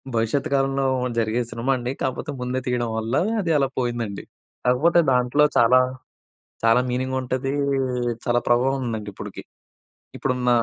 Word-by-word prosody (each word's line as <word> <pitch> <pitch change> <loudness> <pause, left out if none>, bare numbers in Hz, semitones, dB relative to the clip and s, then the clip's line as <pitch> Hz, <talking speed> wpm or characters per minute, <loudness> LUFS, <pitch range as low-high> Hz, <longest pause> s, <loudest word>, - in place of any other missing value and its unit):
భవిష్యత్తు 115 +5 0
కాలంలో 135 0 +1 0.3
జరిగే 115 +1 +1
సినిమా 125 +4 -1
అండి. 120 +1 -3
కాపోతే 135 +3 -2
ముందే 125 +1 -1
తీయడం 120 -2 0
వల్ల 115 +4 -2 0.3
అది 170 -4 -1
అలా 135 -1 +2
పోయిందండి. 120 -5 -3 0.4
కాకపోతే 145 +8 +4
దాంట్లో 125 +4 +3
చాలా, 125 +2 +6 0.8
చాలా 115 +2 +5
మీనింగ్ 130 +1 -1
ఉంటదీ, 130 +1 -2 0.7
చాలా 120 0 +2
ప్రభావం 130 +3 +2
ఉందండి 110 -3 -4
ఇప్పటికి - - -8 0.7
ఇప్పుడున్న 125 -2 0
125 Hz, 130 wpm, -23 LUFS, 120-135 Hz, 0.8 s, చాలా